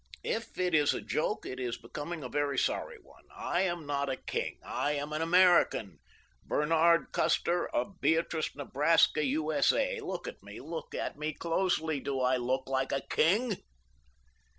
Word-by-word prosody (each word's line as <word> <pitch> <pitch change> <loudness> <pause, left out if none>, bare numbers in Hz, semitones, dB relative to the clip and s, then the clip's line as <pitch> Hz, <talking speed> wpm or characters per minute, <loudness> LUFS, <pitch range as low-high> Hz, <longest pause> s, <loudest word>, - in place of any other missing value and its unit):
If 230 - -3
it 180 -1 0
is 150 -2 +4
a - - -4
joke 180 +7 -2
it 130 - -6
is 125 -2 -2
becoming 150 +7 -6
a - - -4
very 145 +1 -1
sorry 485 -2 -1
one. - - -20
I 175 - -1
am 175 -4 -1
not 140 -1 -1
a 135 - 0
king. - - -3
I 145 - -1
am 145 +1 -3
an 155 - -1
American—Bernard 165 - +2
Custer, 175 +1 +1
of 195 -2 -3
Beatrice, 160 +1 +1
Nebraska, 150 +2 +3
U.S.A. 155 - +1
Look 440 - -5
at - - -8
me. - - -10
Look 485 0 -7
at - - -4
me 155 +1 -2
closely. 165 -2 0
Do 135 0 -3
I 130 0 +2
look 130 +2 -1
like 130 0 -1
a 135 - 0
king?" 205 +6 +2
155 Hz, 160 wpm, -31 LUFS, 140-175 Hz, -, is